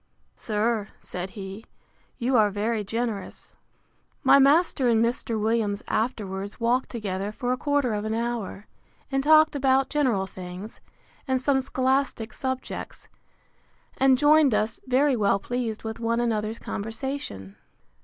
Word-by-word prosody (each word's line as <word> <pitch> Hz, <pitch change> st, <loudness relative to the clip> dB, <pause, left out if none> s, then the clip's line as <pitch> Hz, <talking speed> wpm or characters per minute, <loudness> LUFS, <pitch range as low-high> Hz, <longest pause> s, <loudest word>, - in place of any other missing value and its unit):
Sir, 215 Hz, 0 st, -1 dB
said 180 Hz, +1 st, -6 dB
he, 195 Hz, +2 st, -7 dB, 0.5 s
you 255 Hz, +1 st, 0 dB
are 215 Hz, -3 st, +5 dB
very 210 Hz, +2 st, -1 dB
generous. 225 Hz, -1 st, -4 dB, 0.7 s
My 280 Hz, -, +7 dB
master 280 Hz, -1 st, +4 dB
and 230 Hz, 0 st, +4 dB
Mr. 235 Hz, -1 st, -2 dB
Williams 215 Hz, -2 st, 0 dB
afterwards 205 Hz, -4 st, -2 dB
walked 240 Hz, +3 st, +1 dB
together 200 Hz, -3 st, -3 dB
for 245 Hz, +3 st, -3 dB
a -, -, -2 dB
quarter 285 Hz, -4 st, +1 dB
of 210 Hz, 0 st, -2 dB
an 220 Hz, +1 st, -2 dB
hour; 230 Hz, -3 st, -3 dB, 0.5 s
and 270 Hz, 0 st, +1 dB
talked 310 Hz, +1 st, +6 dB
about 270 Hz, -1 st, +2 dB
general 255 Hz, -10 st, +1 dB
things, 185 Hz, +2 st, -9 dB, 0.5 s
and 260 Hz, -1 st, +1 dB
some 265 Hz, +1 st, +2 dB
scholastic 260 Hz, -3 st, 0 dB
subjects; 260 Hz, +1 st, -5 dB, 0.9 s
and 265 Hz, -1 st, +4 dB
joined 295 Hz, -3 st, +5 dB
us, 215 Hz, +1 st, -1 dB
very 265 Hz, +2 st, +3 dB
well 200 Hz, -3 st, +2 dB
pleased 230 Hz, +1 st, -3 dB
with 220 Hz, 0 st, -5 dB
one 230 Hz, 0 st, 0 dB
another's 220 Hz, -2 st, -1 dB
conversation. 225 Hz, -, -5 dB
230 Hz, 135 wpm, -25 LUFS, 210-260 Hz, 0.9 s, My